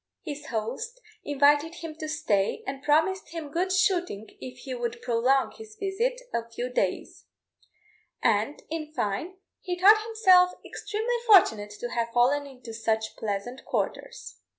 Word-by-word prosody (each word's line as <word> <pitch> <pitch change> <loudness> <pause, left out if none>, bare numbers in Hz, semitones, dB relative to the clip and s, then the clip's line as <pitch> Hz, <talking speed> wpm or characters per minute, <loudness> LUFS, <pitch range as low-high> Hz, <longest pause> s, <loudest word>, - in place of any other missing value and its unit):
His 295 -2 -7
host 255 - -4 0.2
invited 290 +3 +3
him 330 -2 -7
to 310 - -4
stay, 210 -10 0
and 270 0 -5
promised 320 +7 +2
him 320 -3 -7
good 365 +4 0
shooting 360 - 0
if 255 0 -8
he 265 - -6
would 240 -1 -3
prolong 250 +3 +2
his 440 -2 -12
visit 435 +5 -1
a 230 0 -2
few 240 +2 -4
days: - - -2 0.9
and, 225 +6 +1
in 310 -2 -4
fine, 315 - -2 0.2
he 360 -1 -4
thought 420 +4 +7
himself 375 -5 +5
extremely 435 +3 -3
fortunate 220 - +6
to 240 - -4
have 235 -1 -1
fallen 275 +4 +3
into 250 -4 -11
such 220 -1 -1
pleasant 220 +5 -4
quarters. - - -4
290 Hz, 145 wpm, -27 LUFS, 240-375 Hz, 0.9 s, thought